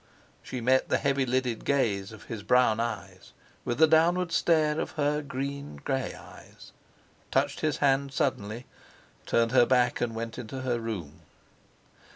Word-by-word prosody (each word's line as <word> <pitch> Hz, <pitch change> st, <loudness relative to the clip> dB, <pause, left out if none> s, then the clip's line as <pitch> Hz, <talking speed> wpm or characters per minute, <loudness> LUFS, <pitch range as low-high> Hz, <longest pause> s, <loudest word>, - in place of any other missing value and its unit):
She 125 Hz, -, -6 dB
met 130 Hz, +3 st, +2 dB
the -, -, +3 dB
heavy 140 Hz, -1 st, 0 dB
lidded 125 Hz, -2 st, -1 dB
gaze 110 Hz, -8 st, 0 dB
of 110 Hz, -2 st, -12 dB
his 115 Hz, -3 st, -6 dB
brown 120 Hz, 0 st, +3 dB
eyes 100 Hz, -6 st, -5 dB, 0.3 s
with 120 Hz, -, -2 dB
the 160 Hz, -, +7 dB
downward 170 Hz, +3 st, +3 dB
stare 155 Hz, -3 st, +2 dB
of -, -, -3 dB
her 150 Hz, 0 st, 0 dB
green 140 Hz, -, -5 dB
grey 130 Hz, -, -3 dB
eyes; -, -, -14 dB, 0.6 s
touched -, -, 0 dB
his 155 Hz, -3 st, 0 dB
hand 140 Hz, -1 st, +2 dB
suddenly, 120 Hz, -3 st, -2 dB, 0.6 s
turned 115 Hz, 0 st, +2 dB
her 125 Hz, -2 st, +5 dB
back, 125 Hz, -1 st, +2 dB
and 115 Hz, -2 st, -1 dB
went 115 Hz, +1 st, -5 dB
into 125 Hz, +3 st, -6 dB
her 125 Hz, -2 st, -1 dB
room. 95 Hz, -10 st, -6 dB
125 Hz, 155 wpm, -28 LUFS, 115-140 Hz, 0.6 s, the